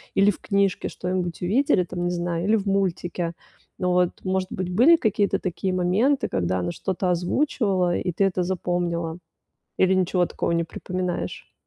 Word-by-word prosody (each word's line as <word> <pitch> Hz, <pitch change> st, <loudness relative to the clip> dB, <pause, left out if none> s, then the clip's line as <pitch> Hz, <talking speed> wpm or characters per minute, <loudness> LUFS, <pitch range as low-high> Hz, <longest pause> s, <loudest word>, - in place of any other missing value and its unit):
Или 200 Hz, +1 st, +5 dB
в -, -, -11 dB
книжке 200 Hz, -2 st, 0 dB
что-нибудь 180 Hz, -2 st, -3 dB
увидели, 205 Hz, -1 st, +3 dB
там, 175 Hz, 0 st, -5 dB
не 175 Hz, -, 0 dB
знаю, 175 Hz, 0 st, -2 dB
или 215 Hz, +2 st, +4 dB
в 205 Hz, -2 st, -1 dB
мультике. 180 Hz, -3 st, -1 dB, 0.5 s
Но 180 Hz, -1 st, +1 dB
вот, 180 Hz, -1 st, +1 dB
может 185 Hz, 0 st, -1 dB
быть, 185 Hz, -1 st, -3 dB
были 255 Hz, -, +7 dB
какие-то 210 Hz, -, +1 dB
такие 185 Hz, +1 st, -2 dB
моменты, 195 Hz, +10 st, +2 dB
когда 95 Hz, 0 st, 0 dB
она 90 Hz, -1 st, -2 dB
что-то 185 Hz, -, -2 dB
озвучивала, 185 Hz, -, +1 dB
и 180 Hz, -, -2 dB
ты 195 Hz, -, 0 dB
это 185 Hz, -1 st, 0 dB
запомнила? 175 Hz, -2 st, -2 dB, 0.6 s
Или 190 Hz, 0 st, +4 dB
ничего 180 Hz, -1 st, +2 dB
такого -, -, -3 dB
не 170 Hz, 0 st, +1 dB
припоминаешь? 180 Hz, +1 st, -4 dB
180 Hz, 165 wpm, -24 LUFS, 175-195 Hz, 0.6 s, были